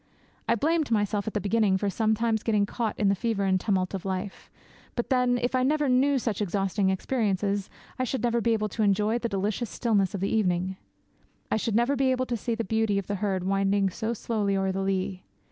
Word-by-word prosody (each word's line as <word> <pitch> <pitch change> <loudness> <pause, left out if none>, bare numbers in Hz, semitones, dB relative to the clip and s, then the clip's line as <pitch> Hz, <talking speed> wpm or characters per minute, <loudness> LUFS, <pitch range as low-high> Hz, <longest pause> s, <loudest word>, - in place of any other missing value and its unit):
I 230 - +4
blamed 310 +4 +1
myself 205 -2 0
at 220 - -4
the - - +2
beginning 205 -1 +2
for 205 - -2
sometimes 220 +2 +1
getting 210 -3 +2
caught 220 +1 -3
in 205 - +2
the - - +4
fever 205 +1 -1
and 190 -1 +2
tumult 190 -3 0
of 195 - -4
life; 190 +1 -5 0.5
but 240 - -3
then, 250 -1 +3
if 245 +1 -1
I 255 - +2
never 295 +3 +2
knew 270 +2 +3
such 225 -5 -2
exhausting 195 0 0
experiences, 200 -1 -1 0.3
I - - +1
should 255 -1 -2
never 235 -1 +1
be 230 0 +2
able 215 -1 -1
to 220 - -4
enjoy 210 +3 +2
the 235 - -2
delicious 205 +3 -2
stillness 205 -6 0
of 190 - -4
the 195 - 0
evening, 185 -3 0 0.8
I - - +3
should 220 0 -1
never 240 +5 +3
be 270 0 +2
able 255 0 +1
to 245 - -2
see 230 +1 -2
the 230 - -2
beauty 220 -1 +1
of 200 - -2
the 205 - -3
herd 190 -3 0
winding 195 0 +1
so 220 +5 -3
slowly 205 -3 -1
o'er 190 0 0
the 190 +1 -2
lea. 190 -1 -2
210 Hz, 220 wpm, -27 LUFS, 195-235 Hz, 0.8 s, I